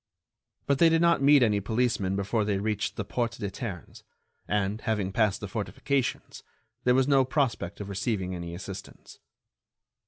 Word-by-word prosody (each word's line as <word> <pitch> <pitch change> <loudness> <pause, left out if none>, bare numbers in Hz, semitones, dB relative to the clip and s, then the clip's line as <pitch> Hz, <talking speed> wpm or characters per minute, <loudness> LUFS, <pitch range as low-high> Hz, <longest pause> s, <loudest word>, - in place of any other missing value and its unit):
But 140 -1 +1
they 165 - +7
did 165 +1 +3
not 170 -3 +4
meet 140 -1 +6
any 105 -3 +2
policemen 105 -3 0
before 100 +3 0
they 100 -1 0
reached 105 -1 -2
the 105 - -4
Porte 120 +2 -1
des 100 -4 -4
Ternes, 95 -7 -7 0.5
and, 105 +1 -1
having 105 -4 -1
passed 105 -1 +1
the 105 - -4
fortifications, 120 +6 -2 0.4
there 125 0 +5
was 130 0 +3
no 135 -2 +5
prospect 130 - -1
of 100 - -5
receiving 100 -1 -2
any 85 -1 -6
assistance. 95 +1 -9
105 Hz, 160 wpm, -28 LUFS, 100-125 Hz, 0.5 s, they